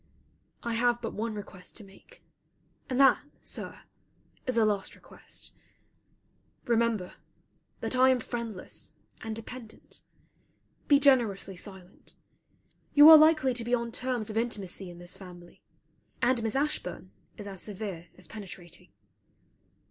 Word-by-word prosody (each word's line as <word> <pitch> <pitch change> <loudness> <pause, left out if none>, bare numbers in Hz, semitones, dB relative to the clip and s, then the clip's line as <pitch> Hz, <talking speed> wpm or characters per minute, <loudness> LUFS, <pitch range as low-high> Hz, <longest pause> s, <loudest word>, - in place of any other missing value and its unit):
I 235 - -2
have 240 +1 +2
but 230 - -4
one 220 +1 -3
request 190 -3 -8
to 220 - -8
make; 195 - -18 0.7
and 255 0 -1
that, 270 -2 +6 0.2
Sir, - - -5 0.6
is 255 -2 0
a 225 - +5
last 205 -2 -1
request. - - -9 1.1
Remember 230 -5 +1 0.6
that - - -1
I 260 +1 +6
am 260 -1 +3
friendless 230 -5 -5 0.3
and 220 -1 -4
dependent. 225 0 -10 0.9
Be 285 - +7
generously 235 -9 +3
silent. 190 0 -12 0.8
You 295 +1 +10
are - - +13
likely 305 -4 +5
to 240 -1 -2
be 240 +2 +2
on 235 -1 -3
terms 245 -3 -2
of 215 - -4
intimacy 200 -5 -2
in 175 - -11
this 175 +1 -7
family, 175 -2 -13 0.6
and 245 -1 +2
Miss 225 +1 -2
Ashburn 295 +2 -2 0.3
is 205 - -8
as 195 -2 -5
severe 195 -5 -5
as 185 - -10
penetrating. 180 -3 -10
225 Hz, 135 wpm, -29 LUFS, 195-245 Hz, 1.1 s, are